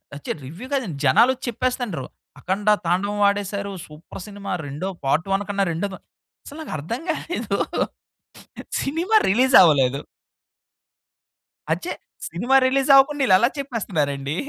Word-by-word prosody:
వచ్చాయి. 145 - -5
రివ్యూ 175 - -9
కాదండి, 230 - -2
జనాలొచ్చి 250 - +4
చెప్పేస్తుండ్రు. 240 - -2 0.3
'అఖండ' 200 +3 0 0.2
తాండవం 200 +4 0
ఆడేశారు. 200 0 -3 0.2
సూపర్ 155 +4 -11
సినిమా 200 -1 -7
రెండో 145 +7 -4 0.2
పార్ట్ 155 +6 +1
1 195 +1 +1
కన్నా 200 -1 +1
రెండో 180 +5 -2 0.6
అసలు 290 - -10
నాకర్థం 200 - -5
కాలేదు. 275 - -2 1.3
సినిమా 340 +10 0
రిలీజ్ 255 +7 +3
అవ్వలేదు 140 -5 +4 1.7
అచ్చే. - - -2 0.4
సినిమా 240 +11 +2
రిలీజ్ 270 +1 +1
అవ్వకుండా 275 +1 +5
ఈళ్ళు 190 - +5
ఎలా 235 +4 +3
చెప్పేస్తున్నారండి? 155 - -2
200 Hz, 115 wpm, -22 LUFS, 165-255 Hz, 1.7 s, అవ్వకుండా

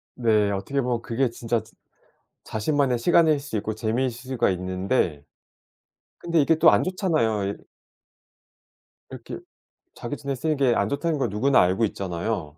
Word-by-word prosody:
네. 110 -4 +2
어떻게 100 +8 -2
보면 120 -2 -1
그게 120 +2 0
진짜 115 -1 -2
즈 110 - -20 0.7
자신만의 130 +2 0
시간일 155 +3 +3
수 140 -5 -4
있고 105 +1 -3
재미일 115 +4 0
수가 125 0 -2
있는데 90 - -1 0.9
근데 170 -2 +1
이게 160 +3 +3
또 160 +1 +6
안 - - +3
좋잖아요. 135 - 0
이 - - -12 1.5
이렇게 - - -8 0.6
자기 120 +5 -5
전에 140 -1 -4
쓰는 155 +4 -1
게 135 -3 +3
안 100 +1 0
좋다는 150 +3 -1
걸 125 -4 0
누구나 130 +7 +3
알고 95 +5 +2
있잖아요. 90 -4 -4
120 Hz, 305 characters per minute, -24 LUFS, 105-140 Hz, 1.5 s, 또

